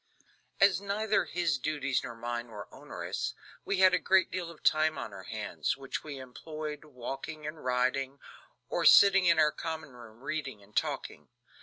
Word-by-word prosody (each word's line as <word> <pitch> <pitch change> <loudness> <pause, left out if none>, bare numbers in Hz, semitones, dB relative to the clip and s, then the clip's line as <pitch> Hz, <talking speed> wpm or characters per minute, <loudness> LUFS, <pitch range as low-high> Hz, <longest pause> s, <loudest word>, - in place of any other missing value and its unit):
As 195 -1 +5
neither 210 +2 +1
his 170 -5 0
duties 140 -2 -1
nor 120 - -6
mine 120 +1 -4
were 105 -3 -9
onerous, - - -4 0.3
we 200 - -1
had 185 -1 +7
a 180 - +4
great 190 -1 +3
deal 175 -2 -3
of 170 - -13
time 155 -1 +3
on 110 -5 -5
our 95 -1 -9
hands, 110 -2 -2
which 135 -1 -5
we 150 -3 -7
employed 150 +4 -7
walking 135 +3 -6
and 155 +1 -6
riding, 130 +2 0 0.5
or - - -1
sitting 195 -2 +8
in 170 - +5
our 155 -1 +5
common 160 -2 -5
room 120 -2 -14
reading 135 -8 -4
and 105 +2 -22
talking. - - -2
150 Hz, 170 wpm, -30 LUFS, 125-170 Hz, 0.5 s, sitting